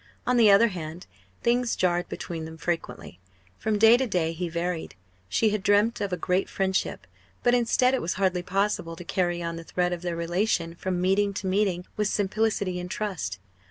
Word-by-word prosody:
On 250 - +2
the 225 -3 +6
other 205 +4 +6
hand, 170 -2 -7 0.4
things 240 0 +2
jarred 175 -1 0
between 165 -2 -5
them 160 0 -9
frequently. 165 - -4 0.4
From 215 -1 0
day 225 +3 +7
to 260 0 0
day 175 -6 0
he 175 +1 -3
varied. 170 0 -3 0.3
She 215 - +2
had 210 -1 -1
dreamt 210 +3 +2
of 200 -2 -2
a 180 - -1
great 180 +3 0
friendship; 190 - -1 0.4
but 245 - +4
instead, 245 +1 +3
it 265 - +1
was 170 - -1
hardly 185 -2 +1
possible 185 -2 -1
to 175 - -9
carry 175 0 -1
on 170 0 -3
the 165 - -7
thread 180 +1 -1
of 175 - -5
their 175 -1 -3
relation 170 0 0
from 180 +1 -3
meeting 195 +2 +2
to 200 - -4
meeting 185 -2 +1
with 210 -1 +1
simplicity 205 -2 0
and 180 0 -6
trust. 185 - -3
185 Hz, 195 wpm, -26 LUFS, 175-210 Hz, 0.4 s, day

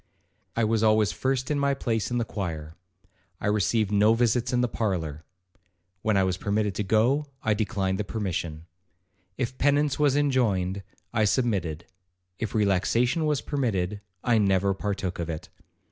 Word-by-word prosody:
I 115 - +1
was 110 0 +2
always 110 -3 +4
first 130 - -1
in 145 - +1
my 140 0 +2
place 115 -5 -1
in 120 - -1
the 120 - 0
choir. 80 -8 -5 0.7
I - - -5
received 105 +1 +1
no 105 +2 +5
visits 120 +1 +1
in 125 -1 +2
the 125 - +2
parlour,—when 90 0 -4
I 95 - +4
was 95 -1 0
permitted 105 +1 0
to 105 - -2
go, 120 +9 +2 0.2
I 110 - +3
declined 100 -2 -1
the - - 0
permission. 85 -7 -3 0.7
If 130 0 -3
penance 145 0 +2
was 145 -2 +3
enjoined, 105 -10 +1 0.3
I 110 -2 +3
submitted; 95 - 0 0.5
if 110 -1 -3
relaxation 115 - +2
was 150 -5 +1
permitted, 105 -9 -1 0.2
I 120 -2 +3
never 100 -1 +2
partook 95 -2 -3
of 85 -1 -3
it. 80 -1 -5
105 Hz, 155 wpm, -26 LUFS, 95-120 Hz, 0.7 s, no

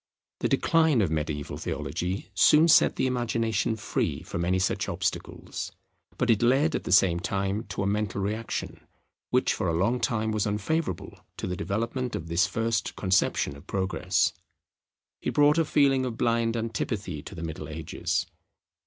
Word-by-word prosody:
The - - 0
decline 160 -5 +3
of 85 - -1
mediaeval 75 -2 -3
theology 95 +3 -4
soon 150 - +6
set 165 - +5
the - - 0
imagination 115 -4 0
free 80 -7 -2
from 85 0 -4
any 90 +2 +2
such 95 - 0
obstacles; - - -4 0.5
but 125 -1 +2
it 110 - +2
led 135 +6 +3
at - - -2
the - - -3
same 90 -2 +5
time 100 +3 -2
to 100 +1 -4
a - - -1
mental 105 0 -1
reaction 105 +3 -3 0.5
which - - +2
for - - -2
a 85 - +1
long 115 +8 +1
time 110 -4 0
was 110 -1 0
unfavourable 105 - -2 0.2
to - - -4
the 90 - -2
development 115 +7 -2
of 80 0 -5
this 85 +5 +3
first 115 +2 -1
conception 95 -6 +1
of 70 - -15
Progress. 95 -1 0 0.9
It - - -3
brought 150 +2 +5
a - - +4
feeling 135 -3 +3
of 120 -3 -3
blind 115 -1 +1
antipathy 105 - -3
to 95 - -10
the 85 - -6
Middle 80 -1 -6
Ages. 80 +1 -2
105 Hz, 165 wpm, -27 LUFS, 90-120 Hz, 0.9 s, soon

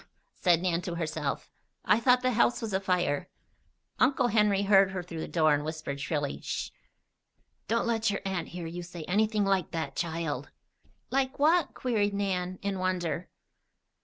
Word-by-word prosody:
said 175 -2 +2
Nan 175 -2 +1
to 175 -1 -4
herself. 155 -3 -3 0.3
"I 210 - +4
thought 250 +1 +4
the 255 - +3
house 240 +1 +3
was 225 -4 -4
afire." 180 -6 0 0.7
Uncle 255 -2 +3
Henry 210 -2 +3
heard 195 -1 +5
her 185 -2 -4
through 165 -2 -7
the - - -4
door 155 -3 +3
and 145 0 0
whispered, 155 -3 -5
shrilly: 145 -2 -2
"Sh! - - -4 1.0
Don't 230 +3 +1
let 225 -2 +1
your 200 - -2
aunt 190 -3 -2
hear 175 -1 -7
you 170 +2 -5
say 175 -1 -8
anything 210 +3 +1
like 195 -3 +1
that, 155 -4 -4
child." 160 -5 -3 0.6
"Like 265 0 0
what?" 315 +2 +3
queried 210 -5 0
Nan, 185 -2 -1
in 200 -1 -2
wonder. 180 -2 -1
185 Hz, 160 wpm, -29 LUFS, 165-210 Hz, 1.0 s, heard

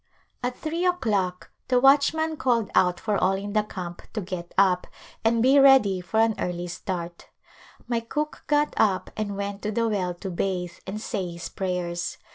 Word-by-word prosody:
At 245 0 -3
three 330 +3 -3
o'clock 205 - 0 0.2
the 250 -1 +3
watchman 295 +4 +4
called 235 -7 +1
out 180 -1 +3
for 210 -2 0
all 190 - +3
in 200 +1 -5
the 215 - +3
camp 180 -4 -7
to 215 - -2
get 175 -2 -6
up 185 -2 +3 0.4
and 230 0 +3
be 270 +2 +6
ready 260 -9 +6
for 180 +5 -1
an 225 0 +4
early 175 0 -2
start. 175 0 -6 0.6
My 235 -1 0
cook 300 +6 -4
got 295 0 +2
up 195 -4 +2
and 205 -2 -3
went 200 0 -4
to 210 - -2
the 230 +2 +1
well 185 -5 -1
to 190 +2 -6
bathe 180 -1 -2
and 200 +3 -4
say 190 -4 -3
his 170 0 -7
prayers. 180 -2 -3
200 Hz, 180 wpm, -25 LUFS, 180-240 Hz, 0.6 s, be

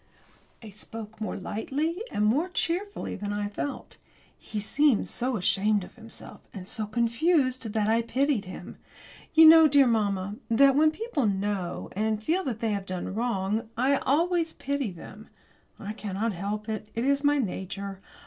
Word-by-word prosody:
I 215 - -9
spoke 215 +1 -9
more 215 - -3
lightly 290 - -3
and 210 - 0
more 290 +12 +2
cheerfully 370 +3 -2
than 205 +1 -4
I 205 0 -2
felt. 210 +7 -6 0.4
He 215 - -6
seemed 270 +3 +2
so 250 -1 -2
ashamed 200 +2 +2
of - - -12
himself, 225 0 -12
and 185 -2 -8
so 215 0 -3
confused, 245 +2 +1
that 215 -2 +1
I 225 +1 +3
pitied 255 -1 0
him. 185 - -9 0.6
You 320 0 +9
know, 320 0 +9
dear 285 -2 +5
mamma, 205 -4 0
that 270 +4 +5
when 310 +2 +5
people 315 - -2
know, 195 -2 -2
and 215 +1 -1
feel, 355 +9 +1
that 230 -4 -3
they 225 -2 0
have 200 -1 -3
done 185 0 -4
wrong, 220 -1 -1
I 270 +3 +3
always 335 +4 +1
pity 280 -4 -2
them. 210 +5 -12 0.5
I 210 +1 -6
cannot 215 +1 -3
help 205 +4 -4
it. 215 -1 -4
It 230 +2 -1
is 280 +1 +2
my 290 0 +4
nature. 195 -3 -4
225 Hz, 165 wpm, -27 LUFS, 205-280 Hz, 0.6 s, You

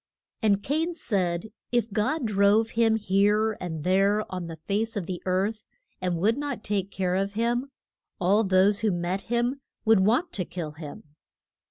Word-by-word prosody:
] - - -56
And 205 -3 +2
Cain 325 +5 -1
said 190 - -1 0.2
if 235 -3 0
God 250 +7 0
drove 210 +2 +3
him 225 -1 +3
here 210 +1 +2
and 160 -4 -4
there 195 +4 +2
on 180 -2 -4
the 165 - -6
face 205 +7 -2
of 190 - -2
the 180 -1 -5
earth, 195 +4 -1 0.3
and 180 -2 0
would 220 +9 +2
not 290 -6 -4
take 200 -2 -1
care 185 -2 -1
of 195 +2 0
him, 240 +4 0 0.5
all 200 +5 +3
those 195 +1 +3
who 220 - +1
met 175 +2 -2
him 240 +3 0 0.2
would 220 -2 +5
want 240 - +2
to 185 - -1
kill 170 -3 -6
him. 150 -1 -9
205 Hz, 175 wpm, -26 LUFS, 185-225 Hz, 0.5 s, would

